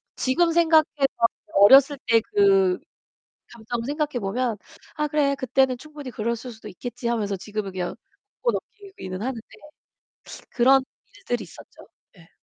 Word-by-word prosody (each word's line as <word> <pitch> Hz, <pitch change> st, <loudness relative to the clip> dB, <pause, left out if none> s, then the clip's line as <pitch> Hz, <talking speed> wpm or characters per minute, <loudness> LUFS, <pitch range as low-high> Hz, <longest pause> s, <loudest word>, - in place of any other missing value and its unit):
지금 335 Hz, +6 st, +1 dB
생각해 325 Hz, -2 st, +5 dB, 0.3 s
봐도 230 Hz, -1 st, +2 dB, 0.3 s
어렸을 275 Hz, +5 st, +7 dB
때 230 Hz, -1 st, +4 dB
그 390 Hz, -, +3 dB, 0.7 s
감정을 230 Hz, 0 st, -5 dB
생각해 295 Hz, -2 st, -2 dB
보면, 225 Hz, +2 st, -2 dB, 0.4 s
'아 300 Hz, 0 st, -1 dB
그래, 290 Hz, -2 st, +1 dB
그때는 260 Hz, 0 st, +1 dB
충분히 295 Hz, -2 st, -10 dB
그랬을 235 Hz, +3 st, -3 dB
수도 220 Hz, -1 st, -11 dB
있겠지.' 235 Hz, +5 st, -6 dB
하면서 210 Hz, -4 st, -1 dB
지금은 205 Hz, 0 st, -5 dB
그냥 180 Hz, +2 st, -4 dB, 0.5 s
웃고 485 Hz, -1 st, +2 dB
넘기기는 385 Hz, -, -7 dB
하는데 250 Hz, -1 st, -3 dB, 1.1 s
그런 265 Hz, +2 st, +4 dB, 0.3 s
일들이 455 Hz, -, -3 dB
있었죠. -, -, -16 dB, 0.3 s
네. 165 Hz, -4 st, -20 dB
255 Hz, 305 characters per minute, -24 LUFS, 225-300 Hz, 1.1 s, 어렸을